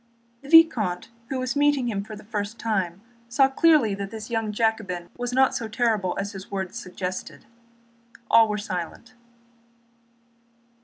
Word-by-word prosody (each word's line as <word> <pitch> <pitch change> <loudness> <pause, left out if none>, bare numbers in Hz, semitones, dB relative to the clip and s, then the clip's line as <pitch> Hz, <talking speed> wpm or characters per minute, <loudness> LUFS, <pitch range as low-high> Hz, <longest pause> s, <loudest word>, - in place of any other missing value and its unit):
The 280 - -12
vicomte 240 - +5 0.2
who 265 - -2
was 255 +1 -2
meeting 290 -3 +2
him 200 -4 -2
for 215 +1 -9
the 210 - -12
first 210 +1 -4
time 195 -5 -2 0.3
saw 270 +3 +4
clearly 275 -5 +4
that 195 0 -4
this 220 +2 -8
young 225 -2 -1
Jacobin 210 -6 -1
was 245 0 -3
not 265 +1 +3
so 230 - -3
terrible 220 -5 0
as 200 +1 -3
his 195 -2 -9
words 190 -2 -4
suggested. 185 0 -6 0.8
All 225 -1 +6
were 210 - -1
silent. 205 +3 -6
220 Hz, 150 wpm, -25 LUFS, 195-245 Hz, 0.8 s, All